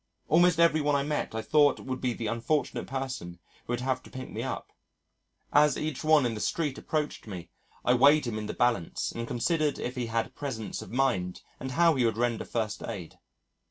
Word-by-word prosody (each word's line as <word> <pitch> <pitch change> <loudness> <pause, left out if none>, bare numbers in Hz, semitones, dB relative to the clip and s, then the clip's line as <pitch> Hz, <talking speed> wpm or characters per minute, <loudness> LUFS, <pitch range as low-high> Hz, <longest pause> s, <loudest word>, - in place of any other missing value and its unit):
Almost 170 +3 +5
every 165 -2 +5
one 145 0 +2
I 140 - +2
met 150 -5 -2
I 110 - -2
thought 145 +2 +4
would 130 -1 -5
be 125 -2 0
the 115 - -5
unfortunate 115 +7 -1
person 130 -10 -4 0.3
who 120 - -1
would 120 - -1
have 130 0 0
to - - -15
pick 130 0 -8
me - - -4
up. - - -4 0.8
As 150 -1 +5
each 155 -2 -3
one 155 -3 +5
in 120 - 0
the 110 - -5
street 150 +3 -1
approached 150 -6 -3
me, 90 -4 -7 0.3
I 125 - +5
weighed 140 +3 +6
him 110 -3 -2
in 105 - -5
the - - -4
balance 120 -9 0
and 115 0 -5
considered 150 +5 0
if 125 - -4
he 125 -2 -2
had 115 0 -1
presence 130 -7 -5
of - - -9
mind 115 -9 0 0.2
and 130 0 -5
how 170 +2 +5
he 130 -4 +1
would 110 -2 +1
render 120 -1 0
first 110 -3 -2
aid. 95 -8 -7
130 Hz, 210 wpm, -29 LUFS, 115-150 Hz, 0.8 s, weighed